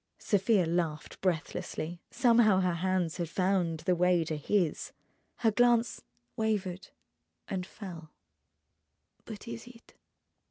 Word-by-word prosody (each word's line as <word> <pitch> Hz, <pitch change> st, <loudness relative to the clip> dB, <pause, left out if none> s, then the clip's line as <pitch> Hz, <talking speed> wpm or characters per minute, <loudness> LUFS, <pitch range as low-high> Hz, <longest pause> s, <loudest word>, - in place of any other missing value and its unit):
Sofia 205 Hz, -2 st, +2 dB
laughed 165 Hz, -2 st, -2 dB
breathlessly. 170 Hz, -1 st, -2 dB
Somehow 230 Hz, -6 st, +4 dB
her 180 Hz, -1 st, +1 dB
hands 180 Hz, -1 st, 0 dB
had 170 Hz, -3 st, -3 dB
found 180 Hz, -3 st, 0 dB
the 180 Hz, +3 st, +2 dB
way 180 Hz, -1 st, +3 dB
to 160 Hz, -1 st, -3 dB
his. 170 Hz, +2 st, 0 dB, 0.4 s
Her 225 Hz, -2 st, +2 dB
glance 240 Hz, +1 st, +3 dB, 0.3 s
wavered 205 Hz, -5 st, -2 dB, 0.6 s
and 185 Hz, -2 st, -3 dB
fell. 170 Hz, -6 st, -9 dB, 1.2 s
"But 215 Hz, 0 st, -9 dB
is 230 Hz, +1 st, -7 dB
it?" 235 Hz, -1 st, -16 dB
185 Hz, 115 wpm, -30 LUFS, 170-215 Hz, 1.2 s, Somehow